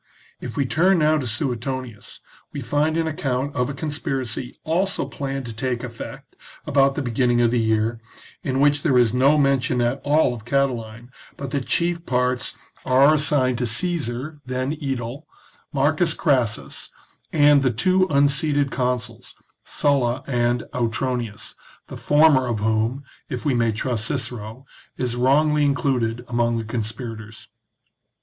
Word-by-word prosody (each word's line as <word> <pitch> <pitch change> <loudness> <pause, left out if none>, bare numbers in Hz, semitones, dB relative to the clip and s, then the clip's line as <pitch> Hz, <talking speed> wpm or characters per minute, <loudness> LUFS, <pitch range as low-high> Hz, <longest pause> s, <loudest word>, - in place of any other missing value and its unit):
If - - -7
we 140 - +2
turn 175 +8 +3
now 155 -1 +3
to 130 - -4
Suetonius, 125 -1 -4 0.3
we - - -5
find 145 +5 0
an 165 - +1
account 140 -3 -2
of 125 +1 0
a - - -3
conspiracy, 135 -5 -3
also 180 +1 0
planned 135 -1 -4
to 115 - -6
take 125 +2 -2
effect 115 -2 -9 0.3
about 140 -2 +3
the 145 - -2
beginning 120 0 +1
of 120 -1 +3
the 120 - +2
year, 110 +1 +1 0.4
in 130 -1 -1
which 145 0 +3
there 140 -5 +2
is 120 -2 +4
no 135 +4 +4
mention 135 -3 +2
at 120 +3 0
all 145 -3 +3
of 115 -3 -9
Catiline, 120 -3 -2 0.3
but 140 -2 -6
the 140 - -1
chief 170 +4 -1
parts 125 -3 -1 0.3
are 135 +4 +5
assigned 140 -5 +2
to 125 - 0
Caesar, 145 +1 -2
then 130 +2 -2
aedile, 135 +1 -4 0.4
Marcus 155 +3 +1
Crassus, 125 - 0 0.4
and 145 -2 +5
the 130 - +2
two 185 - +2
un 140 0 +4
seated 145 -1 0
consuls, 125 -3 -3 0.3
Sulla 135 -3 +1
and 120 -2 0
Autronius, 120 -2 -2 0.4
the - - -7
former 145 -3 +4
of 115 -3 -1
whom, 110 +5 0 0.3
if 130 -2 -5
we 145 - +2
may 115 -2 +2
trust 110 0 -2
Cicero, 125 -2 -4 0.3
is 125 -2 -2
wrongly 150 +4 +3
included 125 -5 0
among 120 -1 0
the 115 - -2
conspirators. 110 0 -5
130 Hz, 150 wpm, -22 LUFS, 120-145 Hz, 0.4 s, are